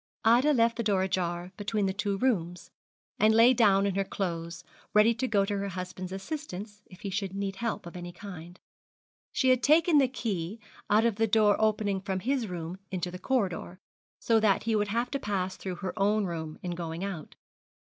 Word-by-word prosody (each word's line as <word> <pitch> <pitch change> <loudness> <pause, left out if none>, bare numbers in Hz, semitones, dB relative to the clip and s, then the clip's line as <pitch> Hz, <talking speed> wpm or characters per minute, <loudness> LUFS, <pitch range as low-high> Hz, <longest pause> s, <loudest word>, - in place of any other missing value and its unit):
Ida 245 +6 +5
left 230 -2 +3
the 235 - -1
door 200 -3 +2
ajar 180 -1 -2
between 205 0 -1
the 190 - 0
two 200 0 -1
rooms, 180 -8 -1 0.5
and 215 +1 +5
lay 235 +3 +7
down 200 -5 +4
in 200 - 0
her 195 +1 +1
clothes, 170 -3 -4 0.3
ready 215 +2 +6
to 235 +3 -2
go 200 -4 +2
to 205 0 -2
her 200 - -2
husband's 185 0 -6
assistance 205 - -6
if 180 - -15
he 200 - -4
should 195 -1 -3
need 195 -1 -3
help 230 -3 -3
of 170 - -9
any 175 0 -6
kind. 175 -2 -10 0.7
She 260 - +2
had 255 -1 +4
taken 310 +2 +5
the 270 - +4
key 215 -6 -4 0.3
out 215 +2 +4
of 230 -3 +1
the 225 0 +2
door 210 -1 +4
opening 210 -3 +1
from 190 -1 -3
his 255 0 0
room 175 0 -6
into 180 -1 -3
the 180 - -8
corridor, 190 -7 -1 0.4
so 225 -1 +2
that 210 -3 +2
he 225 -1 +1
would 210 -1 +1
have 235 +4 -1
to 275 - -1
pass 190 -4 -2
through 185 -2 -5
her 185 +1 -5
own 205 +1 +2
room 160 -3 -5
in 180 - -3
going 170 0 -4
out. 190 -6 -6
200 Hz, 200 wpm, -29 LUFS, 180-225 Hz, 0.7 s, lay